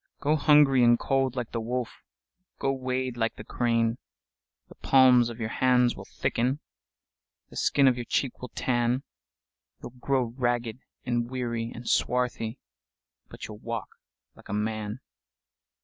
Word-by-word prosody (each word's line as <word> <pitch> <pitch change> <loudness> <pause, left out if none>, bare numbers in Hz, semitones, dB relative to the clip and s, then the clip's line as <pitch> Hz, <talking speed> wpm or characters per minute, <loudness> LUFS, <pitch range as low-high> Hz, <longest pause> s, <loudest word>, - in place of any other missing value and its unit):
Go 150 +2 +2
hungry 145 -4 +5
and 120 0 +6
cold 135 -1 0
like 125 -2 -4
the 115 - -2
wolf, 125 +1 -4 0.6
Go 135 - 0
wade 130 -1 -3
like 115 -1 0
the - - -9
crane:The 115 - -3
palms 125 -3 +5
of 120 0 -8
your 110 -1 -2
hands 125 -1 +3
will - - -10
thicken, 130 +5 -1 0.9
The - - -12
skin 140 -1 +3
of 125 -1 +3
your 120 - -4
cheek 130 +2 -1
will 125 - -6
tan, 120 +1 0 0.8
You - - -6
'll 125 +1 -21
grow 135 0 +1
ragged 120 -1 -2 0.3
and 120 -1 -1
weary 120 -2 -3
and 120 +1 -9
swarthy, 125 -1 0 0.7
But - - -8
you 110 - -8
'll 105 - -12
walk 115 -1 -5 0.4
like - - -18
a - - -3
man! 105 0 -3
120 Hz, 150 wpm, -27 LUFS, 115-130 Hz, 0.9 s, and